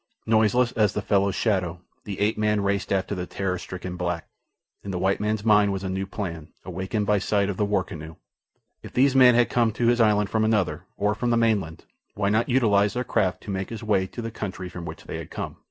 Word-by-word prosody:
Noiseless 115 Hz, +3 st, +3 dB
as 105 Hz, -5 st, +2 dB
the 105 Hz, -, -2 dB
fellow's 100 Hz, -1 st, +2 dB
shadow, 90 Hz, -6 st, 0 dB, 0.3 s
the 100 Hz, -3 st, -5 dB
ape 105 Hz, +2 st, +2 dB
man 105 Hz, -1 st, +1 dB
raced 100 Hz, 0 st, -1 dB
after 95 Hz, +1 st, 0 dB
the 90 Hz, -2 st, -4 dB
terror 95 Hz, -2 st, -2 dB
stricken 90 Hz, 0 st, -6 dB
black. 85 Hz, -2 st, -3 dB, 0.6 s
In 100 Hz, -, -7 dB
the 95 Hz, -, -2 dB
white 95 Hz, +2 st, +1 dB
man's 105 Hz, 0 st, -1 dB
mind 105 Hz, -2 st, +5 dB
was 95 Hz, 0 st, -3 dB
a 95 Hz, -, -3 dB
new 95 Hz, +1 st, -2 dB
plan, 85 Hz, -7 st, -6 dB
awakened 95 Hz, +3 st, -2 dB
by 105 Hz, 0 st, +2 dB
sight 100 Hz, 0 st, +1 dB
of 95 Hz, -, -7 dB
the 105 Hz, -, +1 dB
war 100 Hz, -2 st, +1 dB
canoe. 80 Hz, -4 st, -9 dB, 0.7 s
If -, -, -11 dB
these 135 Hz, +1 st, +3 dB
men 125 Hz, -2 st, +7 dB
had 120 Hz, 0 st, +4 dB
come 115 Hz, -2 st, +2 dB
to 120 Hz, -, -1 dB
his 120 Hz, 0 st, +3 dB
island 105 Hz, -2 st, +3 dB
from 110 Hz, -1 st, +1 dB
another, 95 Hz, -7 st, 0 dB
or 105 Hz, +1 st, +1 dB
from 120 Hz, +3 st, -2 dB
the 120 Hz, -, +3 dB
mainland, 105 Hz, -8 st, 0 dB, 0.3 s
why 100 Hz, 0 st, 0 dB
not 110 Hz, +4 st, +1 dB
utilize 105 Hz, -5 st, +3 dB
their 125 Hz, -, 0 dB
craft 95 Hz, -7 st, 0 dB
to 105 Hz, -, -6 dB
make 95 Hz, -1 st, -3 dB
his 115 Hz, -1 st, -7 dB
way 100 Hz, -3 st, +1 dB
to 120 Hz, -, -7 dB
the 115 Hz, -, -4 dB
country 95 Hz, -4 st, -5 dB
from 90 Hz, -1 st, -8 dB
which 80 Hz, -1 st, -8 dB
they -, -, -6 dB
had -, -, -8 dB
come? -, -, -6 dB
100 Hz, 235 wpm, -25 LUFS, 95-110 Hz, 0.7 s, men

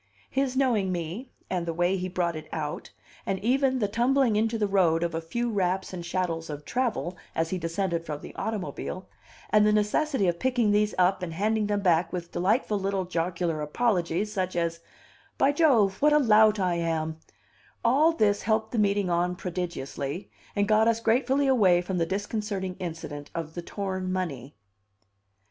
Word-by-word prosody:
His 265 Hz, -1 st, 0 dB
knowing 230 Hz, -8 st, +2 dB
me, 180 Hz, +9 st, -4 dB, 0.2 s
and 175 Hz, -2 st, -2 dB
the 165 Hz, -, -2 dB
way 175 Hz, +2 st, +2 dB
he 185 Hz, -1 st, -3 dB
brought 175 Hz, -2 st, -1 dB
it 155 Hz, -, -8 dB
out, 150 Hz, -2 st, -4 dB, 0.3 s
and 195 Hz, -, -1 dB
even 265 Hz, +2 st, +2 dB
the 215 Hz, -5 st, +1 dB
tumbling 240 Hz, +2 st, +2 dB
into 225 Hz, +2 st, +1 dB
the 215 Hz, -, +1 dB
road 175 Hz, -5 st, +2 dB
of 170 Hz, -1 st, -1 dB
a 165 Hz, -, -2 dB
few 235 Hz, +9 st, -2 dB
wraps 190 Hz, -2 st, -1 dB
and 175 Hz, -2 st, -5 dB
chattels 170 Hz, -2 st, -2 dB
of 150 Hz, 0 st, -6 dB
travel 240 Hz, -8 st, -1 dB, 0.2 s
as 165 Hz, 0 st, 0 dB
he 185 Hz, -, -1 dB
descended 170 Hz, 0 st, -1 dB
from 150 Hz, -3 st, -5 dB
the -, -, -10 dB
automobile, 195 Hz, -3 st, -4 dB, 0.4 s
and 210 Hz, 0 st, +5 dB
the 210 Hz, -, +4 dB
necessity 210 Hz, +3 st, +1 dB
of 170 Hz, -1 st, 0 dB
picking 245 Hz, -5 st, +2 dB
these 210 Hz, 0 st, +2 dB
up 185 Hz, +1 st, +3 dB
and 175 Hz, -3 st, -4 dB
handing 215 Hz, +3 st, +1 dB
them 205 Hz, -1 st, 0 dB
back 170 Hz, -2 st, +2 dB
with 175 Hz, -1 st, -5 dB
delightful 210 Hz, +2 st, +1 dB
little 195 Hz, -1 st, -1 dB
jocular 170 Hz, -2 st, -2 dB
apologies, 185 Hz, +3 st, 0 dB
such 185 Hz, -3 st, -2 dB
as, 170 Hz, -1 st, -1 dB, 0.6 s
"By 275 Hz, -, +4 dB
Jove, 245 Hz, -, +3 dB
what 300 Hz, +1 st, +5 dB
a -, -, +6 dB
lout 215 Hz, -5 st, +5 dB
I 180 Hz, -2 st, +1 dB
am," 160 Hz, -1 st, -2 dB, 0.7 s
all 285 Hz, +8 st, +5 dB
this 210 Hz, -10 st, +2 dB
helped 220 Hz, 0 st, 0 dB
the 235 Hz, -, -1 dB
meeting 200 Hz, -2 st, +2 dB
on 175 Hz, +1 st, +1 dB
prodigiously, 175 Hz, -3 st, -5 dB, 0.2 s
and 205 Hz, 0 st, +1 dB
got 215 Hz, +1 st, +4 dB
us 230 Hz, -1 st, +2 dB
gratefully 255 Hz, +5 st, +2 dB
away 205 Hz, -10 st, +4 dB
from 180 Hz, 0 st, -2 dB
the 165 Hz, -, +1 dB
disconcerting 200 Hz, -1 st, -3 dB
incident 160 Hz, -4 st, -6 dB
of 160 Hz, -2 st, -4 dB
the 175 Hz, -, -5 dB
torn 185 Hz, 0 st, -4 dB
money. 145 Hz, -8 st, -4 dB
190 Hz, 180 wpm, -27 LUFS, 170-220 Hz, 0.7 s, a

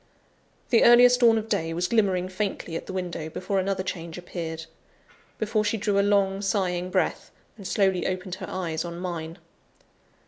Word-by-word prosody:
The 230 Hz, -, +5 dB
earliest 245 Hz, +1 st, +7 dB
dawn 230 Hz, -2 st, +5 dB
of 220 Hz, 0 st, -3 dB
day 165 Hz, -7 st, -1 dB
was 175 Hz, +1 st, 0 dB
glimmering 190 Hz, -4 st, +1 dB
faintly 185 Hz, -3 st, -4 dB
at -, -, -5 dB
the -, -, -5 dB
window, 175 Hz, -4 st, -4 dB
before 190 Hz, +4 st, -2 dB
another 190 Hz, 0 st, -1 dB
change 170 Hz, -3 st, -5 dB
appeared 165 Hz, -2 st, -6 dB, 0.7 s
before 215 Hz, 0 st, 0 dB
she 210 Hz, +2 st, 0 dB
drew 205 Hz, -1 st, +1 dB
a -, -, +5 dB
long, 200 Hz, -1 st, +2 dB
sighing 185 Hz, -2 st, -1 dB
breath, 185 Hz, 0 st, -1 dB, 0.3 s
and 200 Hz, -4 st, -8 dB
slowly 190 Hz, -3 st, +1 dB
opened 185 Hz, -1 st, -4 dB
her 185 Hz, -, -6 dB
eyes 165 Hz, -4 st, -3 dB
on 170 Hz, -1 st, -6 dB
mine. 170 Hz, -2 st, -5 dB
185 Hz, 170 wpm, -26 LUFS, 175-205 Hz, 0.7 s, earliest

